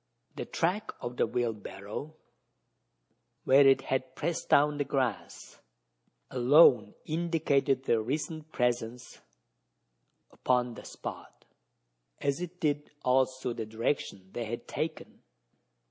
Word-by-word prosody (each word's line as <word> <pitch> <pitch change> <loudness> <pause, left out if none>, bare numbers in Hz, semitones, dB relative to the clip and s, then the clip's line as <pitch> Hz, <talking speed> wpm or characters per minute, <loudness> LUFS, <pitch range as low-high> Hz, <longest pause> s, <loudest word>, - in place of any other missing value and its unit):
The - - -4
track 195 +6 -1
of 120 +1 -6
the - - +2
wheelbarrow, 115 +4 -4 1.3
where 135 +1 +6
it 135 0 +5
had 130 -1 -2
pressed 170 +2 -3
down 145 +1 +4
the - - +2
grass, 135 -2 -3 0.7
alone 125 -4 +5
indicated 150 -5 +1
their 115 -4 +2
recent 155 +5 -4
presence 125 -1 -2 1.1
upon 125 -1 0
the - - -11
spot - - -9 0.7
as 140 +3 -1
it 180 0 -6
did 150 -1 0 0.2
also 130 -1 +1
the 115 -2 -5
direction 110 -4 -2
they 120 - -3
had 115 +2 -6
taken. - - -5
130 Hz, 110 wpm, -30 LUFS, 120-150 Hz, 1.3 s, where